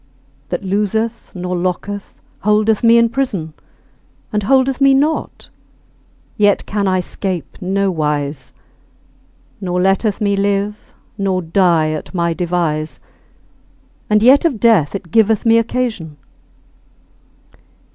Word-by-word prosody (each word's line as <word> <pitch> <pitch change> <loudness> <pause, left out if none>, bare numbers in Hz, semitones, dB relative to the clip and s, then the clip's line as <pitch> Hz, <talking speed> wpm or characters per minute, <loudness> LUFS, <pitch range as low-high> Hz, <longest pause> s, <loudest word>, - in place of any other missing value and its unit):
That 180 +3 -3
loseth 210 +4 -2
nor 180 0 -3
locketh 185 +3 -4 0.2
holdeth 210 +1 +1
me 230 0 +6
in 235 0 +5
prison, 215 - -3 0.8
And 210 - +1
holdeth 265 +4 +2
me 275 0 +5
not, 300 +4 -1 0.9
yet 205 -2 +2
can 200 -1 -1
I 185 -1 +1
'scape 185 +1 -5
nowise; 155 -8 -1 1.1
Nor 180 -1 -2
letteth 195 +3 +1
me 200 -1 +1
live 200 +1 -2 0.3
nor 190 -2 0
die 165 -2 +2
at 155 +4 -6
my 170 -1 0
devise, 165 -3 -2 1.1
And 210 0 +3
yet 265 +4 +6
of 295 -10 0
death 205 -9 +3
it 180 -4 -7
giveth 220 0 +2
me 230 0 +5
occasion. 225 -10 -3
200 Hz, 115 wpm, -17 LUFS, 175-225 Hz, 1.1 s, me